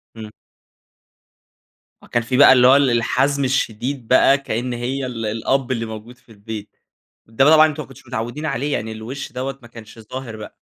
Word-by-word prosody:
إمم. 110 Hz, -1 st, -9 dB, 1.7 s
أ -, -, -14 dB
كان 120 Hz, -, -1 dB
فيه 125 Hz, +2 st, -1 dB
بقى 140 Hz, -1 st, +8 dB
اللي 125 Hz, -1 st, +5 dB
هو 130 Hz, -, +7 dB
ال 140 Hz, -2 st, +4 dB
الحزم 140 Hz, +4 st, +1 dB
الشديد 130 Hz, -1 st, -2 dB
بقى 135 Hz, +2 st, +5 dB
كأن 125 Hz, -2 st, -4 dB
هي 130 Hz, +3 st, -3 dB
ال 115 Hz, -3 st, -5 dB
الأب 120 Hz, +4 st, -1 dB
اللي 115 Hz, -2 st, -2 dB
موجود 110 Hz, +3 st, -9 dB
في 120 Hz, -, -23 dB
البيت. 105 Hz, 0 st, -9 dB, 0.5 s
ده 135 Hz, +6 st, +2 dB
طبعًا 155 Hz, 0 st, +7 dB
أنتم 155 Hz, 0 st, -5 dB
ما -, -, -16 dB
كنتوش 135 Hz, -1 st, -16 dB
متعودين 120 Hz, +5 st, -5 dB
عليه، 140 Hz, 0 st, -2 dB
يعني 110 Hz, -3 st, -3 dB
الوش 110 Hz, +5 st, -7 dB
دوّة 135 Hz, +1 st, -5 dB
ما 120 Hz, -, -14 dB
كانش 115 Hz, -1 st, -13 dB
ظاهر 115 Hz, 0 st, -8 dB
بقى؟ 105 Hz, -, -10 dB
125 Hz, 185 wpm, -20 LUFS, 115-135 Hz, 1.7 s, بقى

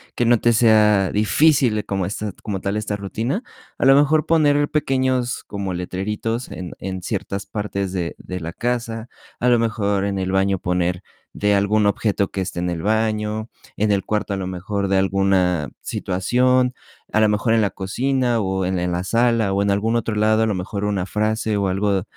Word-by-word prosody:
que 120 Hz, -, +1 dB
no 120 Hz, -1 st, +4 dB
te 120 Hz, -, +3 dB
sea 105 Hz, -4 st, +4 dB
difícil 110 Hz, +1 st, +3 dB
como 95 Hz, -2 st, -1 dB
esta 105 Hz, +1 st, -4 dB
como 100 Hz, -3 st, -3 dB
tal 100 Hz, +1 st, -2 dB
esta 105 Hz, -1 st, -2 dB
rutina, 115 Hz, -, -3 dB, 0.3 s
a -, -, 0 dB
lo 135 Hz, 0 st, +7 dB
mejor 150 Hz, +2 st, +3 dB
poner 145 Hz, -3 st, +3 dB
pequeños 130 Hz, -4 st, 0 dB
como 100 Hz, -2 st, -4 dB
letreritos 105 Hz, +6 st, -3 dB
en 90 Hz, -1 st, -6 dB
en 95 Hz, -1 st, -5 dB
ciertas 100 Hz, -1 st, -3 dB
partes 100 Hz, -2 st, -3 dB
de, 85 Hz, -3 st, -3 dB
de 90 Hz, 0 st, -6 dB
la 85 Hz, +1 st, -5 dB
casa, 115 Hz, -1 st, -3 dB, 0.3 s
a 125 Hz, -, +1 dB
lo 120 Hz, -1 st, +4 dB
mejor 105 Hz, -4 st, 0 dB
en 100 Hz, -1 st, -2 dB
el 95 Hz, 0 st, -2 dB
baño 95 Hz, 0 st, +2 dB
poner 90 Hz, +1 st, -1 dB, 0.3 s
de 105 Hz, 0 st, +1 dB
algún 105 Hz, +1 st, +2 dB
objeto 100 Hz, -1 st, +1 dB
que 95 Hz, -, -3 dB
esté 95 Hz, -2 st, -4 dB
en 90 Hz, -, -1 dB
el 85 Hz, -2 st, -3 dB
baño, 110 Hz, +1 st, -1 dB, 0.3 s
en 105 Hz, 0 st, +2 dB
el 100 Hz, -, 0 dB
cuarto 105 Hz, -1 st, -2 dB
a 95 Hz, -, -2 dB
lo 95 Hz, -, -4 dB
mejor 95 Hz, +2 st, -3 dB
de 95 Hz, -, +3 dB
alguna 95 Hz, -5 st, +1 dB
situación, 125 Hz, +7 st, +1 dB, 0.4 s
a 110 Hz, -, +3 dB
lo 105 Hz, -, +4 dB
mejor 105 Hz, +2 st, +1 dB
en 115 Hz, -, +4 dB
la 105 Hz, -, +2 dB
cocina 120 Hz, +5 st, 0 dB
o 95 Hz, -1 st, -1 dB
en 95 Hz, 0 st, -1 dB
en 90 Hz, 0 st, -1 dB
la 90 Hz, +1 st, -2 dB
sala 115 Hz, -2 st, +2 dB
o 100 Hz, -, +1 dB
en 100 Hz, 0 st, +1 dB
algún 110 Hz, +4 st, +1 dB
otro 115 Hz, -2 st, -1 dB
lado, 110 Hz, +1 st, +3 dB
a -, -, +2 dB
lo 105 Hz, -, 0 dB
mejor 100 Hz, +2 st, -4 dB
una 100 Hz, -3 st, -1 dB
frase 110 Hz, +2 st, -1 dB
o 100 Hz, -1 st, 0 dB
algo, 95 Hz, 0 st, 0 dB
105 Hz, 200 wpm, -21 LUFS, 95-115 Hz, 0.4 s, lo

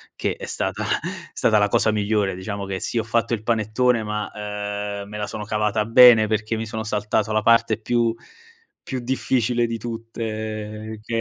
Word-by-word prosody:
che -, -, -2 dB
è -, -, -8 dB
stata -, -, -2 dB
è -, -, -3 dB
stata 110 Hz, -1 st, +3 dB
la 105 Hz, -, +4 dB
cosa 110 Hz, -, +3 dB
migliore. 105 Hz, -2 st, 0 dB
Diciamo 100 Hz, +2 st, -5 dB
che 95 Hz, -1 st, -3 dB
sì, 115 Hz, -, -1 dB
ho -, -, -1 dB
fatto 115 Hz, +1 st, 0 dB
il 110 Hz, -, -1 dB
panettone 115 Hz, +1 st, +1 dB
ma, 105 Hz, 0 st, -3 dB
ehm, 105 Hz, -1 st, -5 dB
me 105 Hz, -, -7 dB
la 105 Hz, -, -2 dB
sono 105 Hz, -, -5 dB
cavata 105 Hz, 0 st, 0 dB
bene 115 Hz, -1 st, +8 dB
perché 110 Hz, +1 st, -1 dB
mi 110 Hz, 0 st, -4 dB
sono 110 Hz, 0 st, -4 dB
saltato 105 Hz, 0 st, -1 dB
la 110 Hz, -, +2 dB
parte 115 Hz, -1 st, +3 dB
più 120 Hz, 0 st, +1 dB, 0.7 s
più 130 Hz, -2 st, -4 dB
difficile 120 Hz, -1 st, 0 dB
di 115 Hz, 0 st, -3 dB
tutte, 110 Hz, -1 st, -5 dB
che 115 Hz, +1 st, -3 dB
110 Hz, 180 wpm, -23 LUFS, 105-115 Hz, 0.7 s, bene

